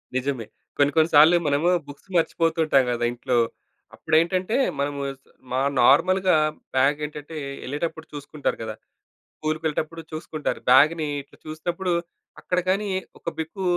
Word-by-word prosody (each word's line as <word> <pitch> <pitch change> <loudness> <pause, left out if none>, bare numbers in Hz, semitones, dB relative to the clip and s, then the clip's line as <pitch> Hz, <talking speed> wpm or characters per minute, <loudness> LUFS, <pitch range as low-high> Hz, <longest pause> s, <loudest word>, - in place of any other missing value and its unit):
నిజమే. 130 -3 -1 0.3
కొన్ని, 145 0 +3
కొన్ని 160 +1 +4
సార్లు 160 +4 +8
మనము 145 +5 +2 0.2
బుక్స్ 145 +7 -13
మర్చిపోతుంటాం 160 -4 +2
కదా 120 0 0
ఇంట్లో. 120 0 -1 0.6
అప్పుడేంటంటే, 180 +6 +1 0.2
మనము 140 0 -2 0.5
మా 130 - +1 0.2
నార్మల్‌గా 185 +7 +4 0.4
బాగేంటంటే, 150 +3 0 0.3
ఎళ్ళేటప్పుడు 160 +3 -4
చూసుకుంటారు 145 0 -3
కదా! 110 -1 -5 0.6
స్కూల్‌‌కెళ్ళేటప్పుడు 155 +1 -2
చూసుకుంటారు. 155 -1 -4
బాగుని 150 +4 +5
ఇట్లా 140 - -21
చూసినప్పుడు 175 +4 -3 0.5
అక్కడ 180 0 0
గానీ 200 +2 +1 0.3
ఒక - - -3
బిక్కు 165 +5 -4
155 Hz, 115 wpm, -24 LUFS, 140-170 Hz, 0.6 s, సార్లు